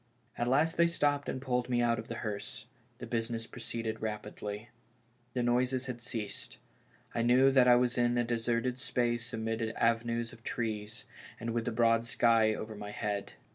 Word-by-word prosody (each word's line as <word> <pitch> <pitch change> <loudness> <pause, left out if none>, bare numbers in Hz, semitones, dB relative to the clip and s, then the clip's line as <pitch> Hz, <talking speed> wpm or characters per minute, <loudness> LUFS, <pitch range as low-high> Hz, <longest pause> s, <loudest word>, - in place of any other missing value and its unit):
At 120 - -1
last 150 +6 +3
they 170 0 +6
stopped 145 -4 +1
and - - -2
pulled 125 -2 -1
me 120 -1 +2
out 120 -1 +2
of 110 - -7
the 115 - -5
hearse 105 +1 -5 0.2
— 120 0 -36
the 125 - -7
business 115 -1 -2
proceeded 115 -2 -5
rapidly. 105 0 -5 0.7
The 125 - +1
noises 125 +1 +2
had 125 -2 -5
ceased; 110 -4 -5 0.6
I 115 - 0
knew 125 +3 +5
that 130 -2 +5
I 125 - +8
was 125 0 +2
in 120 0 +3
a 120 - +3
deserted 120 +1 0
space 120 -2 0
amid 115 -1 -2
avenues 115 +1 0
of 115 - -14
trees, 110 -3 -3 0.3
and 115 +1 -3
with 115 +1 -1
tlie 110 - -1
broad 115 0 +3
sky 115 -2 +4
over 110 +1 -6
my 105 -1 -7
head. 105 -1 -3
120 Hz, 180 wpm, -32 LUFS, 115-125 Hz, 0.7 s, I